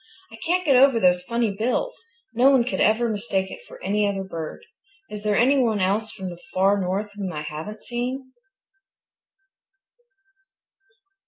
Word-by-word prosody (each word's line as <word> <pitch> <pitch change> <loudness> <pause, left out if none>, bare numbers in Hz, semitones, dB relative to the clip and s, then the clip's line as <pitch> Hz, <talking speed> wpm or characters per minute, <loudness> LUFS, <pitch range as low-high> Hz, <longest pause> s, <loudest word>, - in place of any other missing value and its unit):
I - - -10
can't 355 +9 0
get 275 -4 +4
over 270 -4 +5
those 180 -3 +3
funny 235 +3 -1
bills. 245 - -1 0.4
No 250 +4 +5
one 265 -3 +5
could 250 - -2
ever 220 +3 +3
mistake 200 -3 -2
it - - -9
for - - -12
any 205 0 +1
other 195 -1 -2
bird. 165 -4 -7 0.5
Is 210 -1 -6
there 210 0 +1
anyone 245 -3 +3
else 205 +4 0
now - - -14
from 185 - -3
the 175 0 -11
Far 195 +2 +3
North 195 +3 -2
whom 195 -3 -4
I 150 -2 -5
haven't 160 +8 -7
seen?" 255 +2 -4
215 Hz, 160 wpm, -24 LUFS, 190-245 Hz, 0.5 s, over